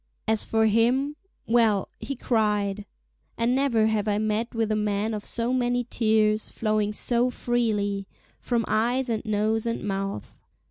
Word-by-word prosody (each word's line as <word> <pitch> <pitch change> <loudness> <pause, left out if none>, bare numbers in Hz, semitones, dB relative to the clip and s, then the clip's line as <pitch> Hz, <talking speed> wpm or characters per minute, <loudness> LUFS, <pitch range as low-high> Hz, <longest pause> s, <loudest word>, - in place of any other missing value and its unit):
As 220 -1 +1
for 220 0 +1
him, 245 +7 +2 0.3
well—he 225 +3 +1
cried. 210 -4 0 0.5
And 235 +1 +1
never 255 -5 +2
have 220 -1 0
I 205 -1 +1
met 215 +2 -1
with 225 -1 0
a - - +2
man 210 +1 -1
of 210 -1 -4
so 235 +1 -1
many 245 -1 +1
tears, 215 -1 +2
flowing 215 -2 0
so 240 +3 +1
freely—from 225 -1 -2
eyes 245 +4 +1
and 225 -2 -1
nose 215 +1 0
and 230 - -2
mouth. 195 - -4
220 Hz, 140 wpm, -26 LUFS, 210-235 Hz, 0.5 s, him